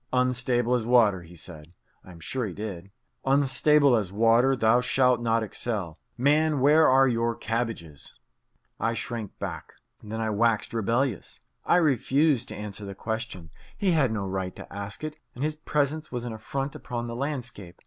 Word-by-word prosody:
"Unstable 125 -1 +1
as 125 -2 +1
water," 110 -6 +4
he 85 +1 -14
said 80 -1 -11 0.3
(I - - -15
am 85 -2 -12
sure 120 +8 -3
he 95 - -6
did) 100 -3 -6 0.3
"unstable 140 0 +4
as 105 -5 -1
water, 115 +5 +4
thou 115 0 +3
shalt 125 -1 +2
not 115 -1 +1
excel. 105 -6 -3 0.2
Man, 150 +3 +3
where 150 +4 +5
are 135 +1 +5
your 115 -1 0
cabbages?" 110 - -4 0.6
I 115 +2 0
shrank 115 -5 -5
back. - - -6 0.3
Then 110 +1 -6
I 110 -1 -1
waxed 115 +1 +1
rebellious. 115 0 -1 0.2
I - - +4
refused 140 -3 +2
to - - -6
answer 105 0 -6
the 100 -1 -7
question. 110 -6 -5 0.3
He 200 -3 +1
had 145 -8 +2
no 105 -3 -2
right 95 -1 -3
to - - -11
ask 100 +4 -6
it, 155 0 -5 0.2
and 125 - -4
his 155 0 -1
presence 150 0 -1
was 120 -1 -4
an 120 - -4
affront 135 +6 -4
upon 120 -1 -5
the 115 0 -5
landscape. 125 - -5
120 Hz, 170 wpm, -26 LUFS, 105-135 Hz, 0.6 s, where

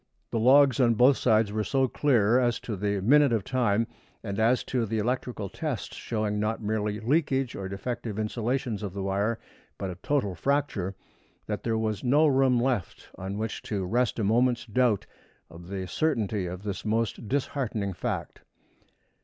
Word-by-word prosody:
The 115 - 0
logs 135 +2 +5
on 120 -3 +4
both 125 +5 +6
sides 110 -3 +3
were 110 0 -1
so 135 +3 +1
clear 120 -4 +3
as 120 -2 +1
to 110 - -4
the 100 0 -1
minute 140 +6 +5
of 110 -4 +1
time, 115 -3 +1 0.4
and 100 -1 -4
as 115 +3 +3
to 120 -3 -1
the 110 +2 -2
electrical 120 -1 -2
tests 150 - -4
showing 105 -2 -2
not 110 +2 -1
merely 105 -1 -2
leakage 135 +1 +1
or 95 -1 -5
defective 110 +2 -4
insulations 115 +1 -2
of 100 -4 -5
the 100 -1 -4
wire, 100 +4 0 0.4
but 95 -2 -4
a - - -7
total 130 -9 0
fracture, 105 - -1 0.5
that - - -3
there 115 -1 0
was 110 -2 -2
no 145 +5 +4
room 135 -3 +4
left 120 -7 -2
on 95 +2 -5
which 110 0 -3
to 100 -3 -3
rest 120 +5 +1
a 110 - -1
moment's 120 +4 +2
doubt 115 -2 +1 0.5
of 85 +1 -11
the 95 0 -4
certainty 110 - 0
of 90 +2 -6
this 100 -2 -4
most 110 0 -1
disheartening 115 -6 -2
fact. - - -4
110 Hz, 170 wpm, -27 LUFS, 100-125 Hz, 0.5 s, both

